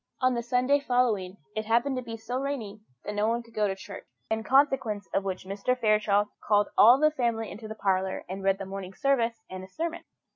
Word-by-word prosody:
On 255 0 +3
the 235 - -1
Sunday 250 +4 +2
following, 230 -8 0 0.2
it 215 - -2
happened 240 +4 +2
to - - -2
be 230 -2 -7
so 235 +3 -4
rainy 235 -7 -4 0.2
that 210 - -3
nobody 225 +3 0
could 230 -1 -20
go 210 -1 +1
to 195 - -2
church, 195 0 -10 0.2
in 220 0 0
consequence 255 -6 +2
of 195 - +1
which 190 -1 -4
Mr. 200 +6 -1
Fairchild 210 -2 +3 0.2
called 205 -1 +3
all 240 +5 +8
the 305 +1 +4
family 235 -6 -1
into 215 +2 -8
the 220 - -7
parlour 190 -2 -1
and 190 +2 -6
read 195 0 +2
the 195 - -6
Morning 190 -1 -7
Service 235 -5 +1
and 185 0 -7
a - - -9
sermon. 330 - -4
220 Hz, 215 wpm, -28 LUFS, 200-250 Hz, 0.2 s, all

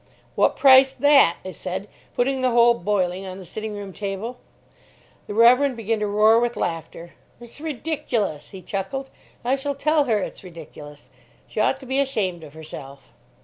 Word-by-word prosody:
"What - - +2
price 265 -1 +6
that?" 285 -11 +5
I 185 - -5
said, 185 +2 -6 0.3
putting 265 +2 0
the 255 - +2
whole 240 0 +5
boiling 190 -3 -1
on 185 0 -7
the 190 - -10
sitting 215 +4 -6
room 200 -2 -7
table. 205 +5 -5 0.9
The 205 - -6
Reverend 250 +3 +5
began 225 0 -1
to 210 - -1
roar 215 +2 +4
with 240 -1 -1
laughter. 165 0 -5 0.3
"It's 240 +4 -9
ridiculous," 270 - -3
he 190 -2 -11
chuckled. 240 +10 -4 0.3
"I 255 +2 +2
shall 280 +1 -3
tell 300 +1 +2
her 225 -4 +1
it's 200 - -5
ridiculous. 150 -4 -12 0.3
She - - -6
ought 265 - +2
to - - -10
be 265 +2 -1
ashamed 200 -11 -1
of 150 -1 -13
herself." 140 -3 -11
215 Hz, 170 wpm, -23 LUFS, 185-265 Hz, 0.9 s, price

